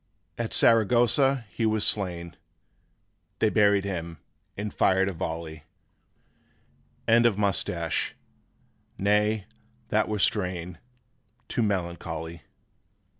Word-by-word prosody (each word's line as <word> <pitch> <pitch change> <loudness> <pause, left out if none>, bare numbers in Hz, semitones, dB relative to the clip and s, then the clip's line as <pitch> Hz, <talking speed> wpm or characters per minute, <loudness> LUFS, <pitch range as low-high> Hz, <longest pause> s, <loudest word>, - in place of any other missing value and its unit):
') - - -45
At 110 - -5
Saragossa 120 +3 +3
he 115 - -3
was 110 -1 +1
slain; 85 -4 0 1.0
They 110 - +2
buried 100 -2 +4
him, 85 -4 -5 0.4
and 105 +1 -4
fired 95 0 +3
a - - -5
volley: 80 -2 -5 1.4
End 115 +1 +5
of 105 -4 0
Moustache. 90 -5 -1 0.8
Nay, 105 +1 +1 0.4
that 110 0 +2
were 105 - -1
strain 90 -4 -1 0.7
Too - - -1
melancholy. 85 -5 -3
100 Hz, 100 wpm, -26 LUFS, 85-110 Hz, 1.4 s, End